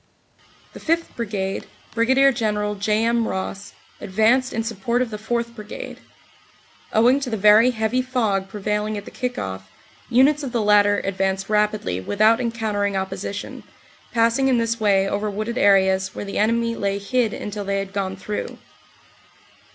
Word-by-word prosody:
The - - -10
5th 330 +1 -1
Brigade, 200 -4 -3 0.3
Brig. 265 +3 +4
General 210 -2 -1
J. 210 +2 0
M. 235 -1 +1
Ross, 195 +1 -5 0.3
advanced 220 +6 +2
in 225 - -2
support 230 +2 -1
of 250 -2 -1
the 210 - -5
4th. 235 +2 -2
Brigade. 210 -2 -8 0.9
Owing 245 +5 +4
to 270 -3 -4
the 220 - -2
very 210 +4 +6
heavy 235 +1 0
fog 225 -7 -1
prevailing 210 +1 -2
at 205 - -7
the - - -10
kick 250 -1 -4
off, 95 0 -5 0.4
units 270 +5 +4
of 265 -4 -5
the 235 - +1
latter 205 0 +4
advanced 195 0 -1
rapidly 210 - 0
without 215 - +2
encountering 215 -4 -1
opposition, 190 +1 -5 0.5
passing 230 +3 +2
in 260 -2 +3
this 230 0 0
way 195 -2 +3
over 205 +2 -1
wooded 215 +4 -3
areas 190 -1 +3
where - - -5
the 200 - -3
enemy 230 +2 +1
lay 200 -2 -1
hid 225 +3 0
until 205 0 -5
they 200 0 -1
had 195 0 -4
gone 190 -1 -2
through. 205 +2 -5
215 Hz, 160 wpm, -22 LUFS, 200-235 Hz, 0.9 s, very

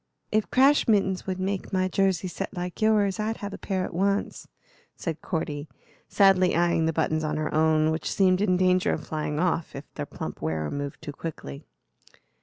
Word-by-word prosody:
"If 215 0 +1
crash 275 +3 +4
mittens 195 -4 +1
would 185 -1 -2
make 190 0 -3
my 185 -1 +1
jersey 190 -1 +1
set 180 - -5
like 180 +2 -5
yours 210 -2 +3
I'd 220 +1 -1
have 205 -1 -6
a - - -7
pair 190 -2 -2
at - - -7
once," 200 +3 -1 0.5
said 160 -3 -5
Cordy, 150 -2 -3 0.4
sadly 190 -2 +4
eyeing 170 -1 +2
the - - +2
buttons 155 0 0
on 150 0 -1
her 155 0 -2
own, 155 0 +3
which 160 - -2
seemed 185 -1 +3
in 185 -3 +3
danger 185 0 +3
of 155 - -5
flying 155 -1 -3
off 170 -2 0
if 140 +2 -7
their - - -5
plump - - -7
wearer 80 -1 -2
moved 140 -1 -5
too 145 - -5
quickly. 140 - -7
180 Hz, 190 wpm, -26 LUFS, 155-195 Hz, 0.5 s, crash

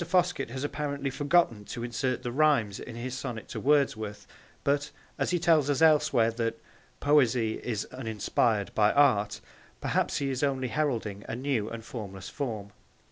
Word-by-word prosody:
Foskett 175 -6 +1
has 130 +3 -5
apparently 145 -2 -2
forgotten 145 -6 +2
to 120 - -6
insert 125 +2 -2
the 120 - -3
rhymes 130 -8 +2
in 120 - -8
his 125 +2 -4
sonnet 115 -4 -5
to - - -5
Wordsworth; 120 -8 +1 0.4
but, 145 +1 +1 0.3
as - - +1
he 180 - +2
tells 160 -4 +3
us 145 - +1
elsewhere 150 -7 +4
that 115 0 -2 0.4
'Poesy 125 -6 +3
is 110 -4 -2
uninspired 110 -3 0
by 105 -1 +4
Art,' 115 -8 +3 0.4
perhaps - - 0
he 140 -1 -1
is 130 - -2
only 135 -3 0
heralding 115 -9 -1
a - - -2
new 125 -4 -1
and 115 -1 -7
formless 95 -6 -7
form. 110 -8 -4
125 Hz, 160 wpm, -29 LUFS, 110-145 Hz, 0.4 s, elsewhere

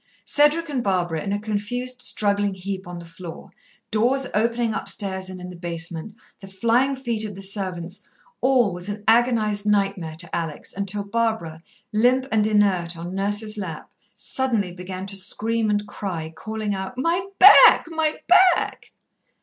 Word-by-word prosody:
Cedric 295 +3 +3
and 270 -5 -2
Barbara 175 -5 0
in 200 - -3
a 205 - 0
confused 245 +4 -4
struggling 205 -4 +1
heap 190 0 -6
on 175 0 -7
the 170 - -9
floor 165 0 -10 0.4
doors 250 +5 +2
opening 230 +1 +1
upstairs 190 -2 -3
and 185 -1 -8
in 180 0 -8
the 180 - -9
basement 170 +3 -5 0.2
the 195 - -11
flying 235 +8 +1
feet 235 -5 -2
of 210 -3 -5
the 195 - -9
servants 185 -3 -4 0.4
all 250 -7 +3
was 180 +3 -7
an 205 0 -5
agonized 220 -3 +2
nightmare 195 -6 0
to 170 +1 -4
Alex 165 -3 -5
until 200 +1 -1
Barbara, 205 -7 -2 0.3
limp 250 +4 +3
and 215 -1 +2
inert 190 -5 +1
on 175 +2 -6
Nurse's 205 +2 -1
lap, 165 -6 -7 0.2
suddenly 230 -8 0
began 185 +1 -7
to 195 0 -1
scream 220 +3 0
and 205 0 0
cry, 170 -7 -5
calling 215 +3 -4
out, 190 +5 -5
"My 340 +7 0
back! 395 +2 +9
my 320 -2 -1
back!" 365 0 +3
205 Hz, 160 wpm, -23 LUFS, 185-230 Hz, 0.4 s, back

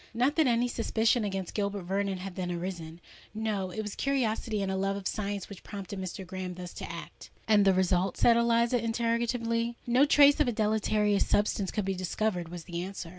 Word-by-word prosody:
Not 255 +5 +2
that 315 -4 +4
any 240 0 +2
suspicion 230 0 +1
against 195 -3 -3
Gilbert 200 -2 -2
Vernon 195 +1 -1
had 185 0 -6
then 180 -2 -3
arisen: 170 -2 -5 0.4
no—it 215 -2 -2
was 210 -1 -5
curiosity 225 -6 -1
and 190 - -1
a - - -1
love 195 +1 0
of 200 -1 -4
science 205 -2 -3
which 200 - -10
prompted 200 -1 -7
Mr. 185 +1 -5
Graham 185 0 -5
thus 180 -1 -8
to - - -6
act." - - -9 0.2
"And 210 -2 +5
the 195 - +5
result?" 185 0 +1
said 235 - +5
Eliza, 235 0 +2
interrogatively. 230 0 0
"No 250 +4 +4
trace 285 -1 +6
of 300 - +3
a - - +2
deleterious 210 -1 +1
substance 205 -2 +1
could 210 -3 -2
be 195 - 0
discovered," 185 -1 -2
was 175 -1 -7
the 170 -1 -5
answer. 185 -2 -6
205 Hz, 195 wpm, -29 LUFS, 190-230 Hz, 0.4 s, trace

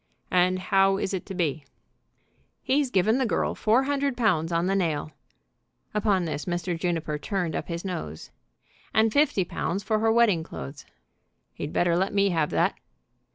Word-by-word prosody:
"And 180 0 +3
how 195 +1 +3
is 195 - -2
it 185 - -4
to 195 - -6
be?" 160 -4 -1 1.0
"He's 275 0 +1
given 220 +3 +2
the 260 - +2
girl - - 0
four 230 +5 +2
hundred 280 -2 -1
pounds 175 -9 +1
on 170 +1 +1
the 190 - +1
nail," 160 -5 -1 0.8
upon 205 -4 +1
this 155 -2 -4
Mr. 175 0 -2
Juniper 165 -3 -2
turned 180 -1 -2
up - - -3
his 170 +1 -5
nose, 80 - -5 0.6
"and 220 0 +4
fifty 285 -10 +3
pounds 185 +3 -3
for 215 -1 0
her 225 +1 +3
wedding 225 -7 +4
clothes." 145 -3 -8 0.7
"He'd 145 - -5
better 175 -1 +2
let 190 +3 0
me 200 0 +3
have 160 -4 +1
that." - - +1
185 Hz, 165 wpm, -26 LUFS, 170-215 Hz, 1.0 s, and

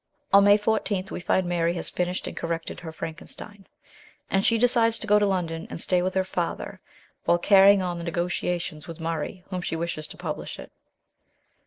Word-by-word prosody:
On 200 0 +8
May 205 0 +7
14 205 -3 -1
we - - -4
find 185 +1 +1
Mary 170 -1 +1
has - - -3
finished 180 +1 -2
and - - -6
corrected 165 0 -4
her 165 -1 -7
Frankenstein, 190 +5 -9 0.6
and 195 0 +2
she 230 - +4
decides 230 -1 +3
to - - -5
go 210 0 +5
to 205 - +2
London 170 -4 -2
and - - -6
stay 180 +1 +1
with 185 +1 -2
her 190 - +3
father 175 -2 -4 0.4
while 170 - +4
carrying 195 +1 +6
on 175 -1 -3
the - - -5
negotiations 170 -2 -2
with 165 0 -8
Murray 165 +2 -4
whom 185 -1 -2
she 170 - -2
wishes 165 -2 -3
to - - -12
publish - - -5
it. - - -11
180 Hz, 190 wpm, -25 LUFS, 170-200 Hz, 0.6 s, On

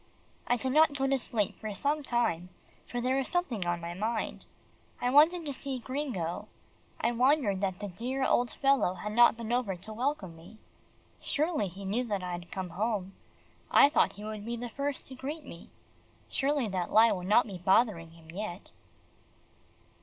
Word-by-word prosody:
I 245 - +3
did 260 +3 -2
not 300 0 +4
go 270 - 0
to 270 0 +2
sleep 215 -4 -1
for 215 -1 -5
some 290 +6 +1
time, 235 - 0 0.4
for 245 - -3
there 255 +2 +1
was 270 - -1
something 250 - -1
on 175 0 0
my 170 0 -5
mind. 220 +4 -3 0.5
I 245 - 0
wanted 320 +5 +5
to 285 - -3
see 270 0 -4
Gringo. 235 - -3 0.5
I 235 - +1
wondered 245 -5 +2
that 190 -2 -1
the 205 - -5
dear 250 +8 -2
old 245 0 +2
fellow 270 -10 +2
had 210 +2 -5
not 240 0 +6
been 230 -1 -5
over 240 -6 0
to 190 +5 -9
welcome 230 - -2
me. 175 +7 -14 0.6
Surely 305 - 0
he 195 +2 -9
knew 215 +6 0
that 200 -5 -2
I 180 - -3
had 175 0 -6
come 185 -2 -5
home. 200 -1 -2 0.6
I 280 - +7
thought 295 - +3
he 205 - -10
would 215 -1 -5
be 235 +2 -3
the 240 +1 -5
first 280 +3 -3
to 265 - -9
greet 290 +4 -6
me. 170 - -11 0.6
Surely 280 -3 0
that 185 -2 -2
lie 225 +2 +6
would 180 -1 -3
not 215 +4 +5
be 195 -5 -7
bothering 190 -2 +2
him 165 -1 -15
yet. 190 0 -6
225 Hz, 185 wpm, -30 LUFS, 190-265 Hz, 0.6 s, I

